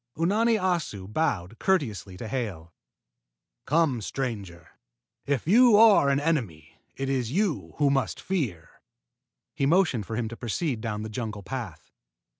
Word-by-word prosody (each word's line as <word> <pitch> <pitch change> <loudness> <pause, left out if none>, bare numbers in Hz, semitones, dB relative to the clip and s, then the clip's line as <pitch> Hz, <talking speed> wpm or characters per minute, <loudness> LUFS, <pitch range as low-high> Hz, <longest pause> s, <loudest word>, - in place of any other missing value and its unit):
Unani 215 +8 +2
Assu 170 - -1
bowed 105 - -2
courteously 110 - -1
to 110 - -6
Hale. 100 -10 -4 0.9
"Come, 150 -6 +2
stranger. 100 -9 -5 0.6
If 140 -4 0
you 230 +3 +6
are 215 -10 +6
an 140 0 +2
enemy, 115 - -2 0.2
it 135 - -3
is 130 -4 -1
you 190 +1 -1
who 145 -2 +3
must 135 -1 -1
fear." 130 - -4 0.7
He 135 - 0
motioned 155 - +2
for 115 - -4
him 115 -1 -1
to 115 - -7
proceed 120 +1 -2
down 105 -2 -3
the 110 - -5
jungle 105 -2 -5
path. 95 - -7
130 Hz, 140 wpm, -26 LUFS, 105-165 Hz, 0.9 s, you